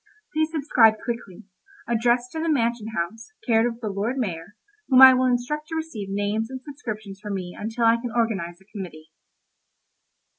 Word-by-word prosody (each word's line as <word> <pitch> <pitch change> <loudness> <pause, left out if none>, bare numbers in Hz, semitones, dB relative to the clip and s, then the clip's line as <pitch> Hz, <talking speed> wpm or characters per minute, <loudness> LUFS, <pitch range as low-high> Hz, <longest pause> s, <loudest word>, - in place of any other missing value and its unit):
Please 310 0 +1
subscribe 270 -8 +4
quickly. 230 -4 -5 0.4
Address 240 +1 +2
to 320 - -5
the 330 +1 -1
Mansion 235 -6 0
House, 220 - -4
care 225 -1 +3
of 230 0 -9
the 215 - -2
Lord 205 +6 -2
Mayor, 190 -4 -4 0.3
whom 260 -2 +6
I 265 0 +11
will 255 0 +2
instruct 255 +5 -1
to 320 - -5
receive 280 -12 -5
names 205 +3 -1
and 260 0 -6
subscriptions 215 -8 -7
for 210 - -7
me 185 -3 -4
until 225 +2 -2
I 230 +1 +5
can 235 0 -5
organise 195 -8 -1
a 190 - -23
committee. 175 -7 -9
230 Hz, 175 wpm, -24 LUFS, 205-255 Hz, 0.4 s, I